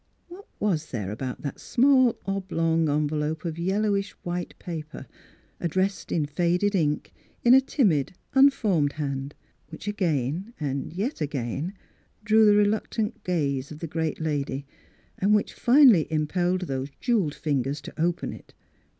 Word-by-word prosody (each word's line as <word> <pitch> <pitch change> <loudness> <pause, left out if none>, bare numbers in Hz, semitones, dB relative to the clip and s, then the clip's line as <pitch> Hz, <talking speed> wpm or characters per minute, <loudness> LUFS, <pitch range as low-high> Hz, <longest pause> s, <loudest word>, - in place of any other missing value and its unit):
What 380 +4 -12
was 170 -7 0
there 105 -5 -4
about 125 +4 -5
that 140 - -5
small 260 -1 +4
oblong 165 -5 0
envelope 150 +2 -1
of 165 -1 -4
yellowish 200 +2 0
white 175 0 -4
paper, 155 -5 -7 0.5
addressed 190 +4 -1
in 155 -3 +1
faded 175 +6 +1
ink, 150 -6 0 0.3
in 240 - +7
a 265 - +8
timid, 195 - +1 0.2
unformed 215 - +4
hand, 140 -1 -4 0.3
which 160 +5 -10
again 180 - -1
and 140 -2 -3
yet 200 - -3
again 145 - -3 0.5
drew 220 0 +5
the 205 - +6
reluctant 210 +1 0
gaze 140 -6 -1
of 150 - -7
the 165 - -5
great 160 0 -2
lad}', 145 -3 -2 0.6
and 205 +3 +4
which 210 - 0
finally 240 - +5
impelled 175 +4 0
those 135 -5 -3
jewelled 205 - +1
fingers 140 -2 -1
to - - -7
open 170 +1 0
it? - - -14
170 Hz, 140 wpm, -26 LUFS, 150-205 Hz, 0.6 s, a